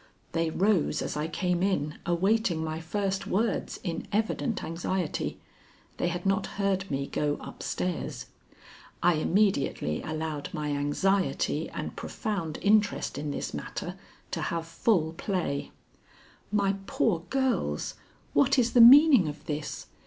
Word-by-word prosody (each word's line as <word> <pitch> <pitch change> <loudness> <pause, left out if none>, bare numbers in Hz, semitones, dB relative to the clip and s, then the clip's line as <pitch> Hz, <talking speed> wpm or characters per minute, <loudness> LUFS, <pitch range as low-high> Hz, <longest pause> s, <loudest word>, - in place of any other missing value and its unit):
They 165 -1 0
rose 180 -3 +1
as - - -4
I 150 +1 -1
came 180 +1 -1
in, 155 -6 0
awaiting 180 -1 +2
my 160 0 -3
first 195 +3 -2
words 215 +2 -1
in 170 -4 -4
evident 220 +1 0
anxiety. 175 +1 -2 0.6
They - - 0
had 175 +1 -3
not 195 +1 +1
heard 195 -1 0
me 140 0 -1
go 145 +1 -1
up - - -10
stairs. 180 -2 -3 0.8
I 175 0 +5
immediately 155 - +1
allowed 155 -2 -4
my 150 -1 -2
anxiety 165 +7 0
and - - -5
profound 190 -9 -3
interest 205 -6 +2
in 150 0 -3
this 140 - -4
matter - - -5 0.4
to - - -2
have 165 -1 -2
full 165 -1 +1
play. 165 -6 -2 0.8
"My 200 -1 +2
poor 190 -8 +1
girls! 255 - 0 0.4
What 145 - +4
is 240 -2 +2
the 245 - +7
meaning 260 - +9
of 150 0 -7
this? 150 0 -4
175 Hz, 135 wpm, -28 LUFS, 155-200 Hz, 0.8 s, meaning